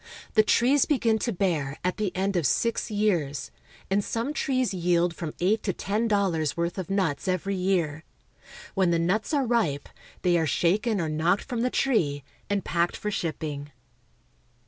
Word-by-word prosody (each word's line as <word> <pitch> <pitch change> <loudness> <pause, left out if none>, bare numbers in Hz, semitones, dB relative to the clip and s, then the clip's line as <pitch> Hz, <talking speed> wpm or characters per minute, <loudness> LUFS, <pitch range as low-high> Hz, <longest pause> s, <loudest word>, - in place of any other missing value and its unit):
The 220 - +6
trees 250 +6 +3
begin 230 -7 +2
to 235 - -1
bear 165 -8 -1
at 180 0 -1
the 210 -4 -1
end 195 +1 0
of 170 -6 +2
six 230 - 0
years, 180 -10 0 0.4
and 200 +1 +1
some 235 +8 -2
trees 255 -7 0
yield 175 -1 +1
from 155 -1 -5
eight 205 +5 +2
to 190 - -1
ten 210 +7 -1
dollars' 185 -9 +1
worth 170 +2 -1
of 185 - -5
nuts 190 -6 0
every 185 +2 0
year. 175 -5 0 0.7
When 190 -3 +2
the 170 - +2
nuts 185 - 0
are 285 -4 +2
ripe, 220 - 0 0.4
they 175 -1 +3
are 160 - +1
shaken 200 - +1
or 165 - -1
knocked 160 +5 +1
from 245 -3 -3
the 250 - +2
tree, 155 - +1 0.3
and 200 -1 -1
packed 170 0 0
for 210 - -3
shipping. 150 -5 -3
185 Hz, 170 wpm, -26 LUFS, 165-215 Hz, 0.7 s, The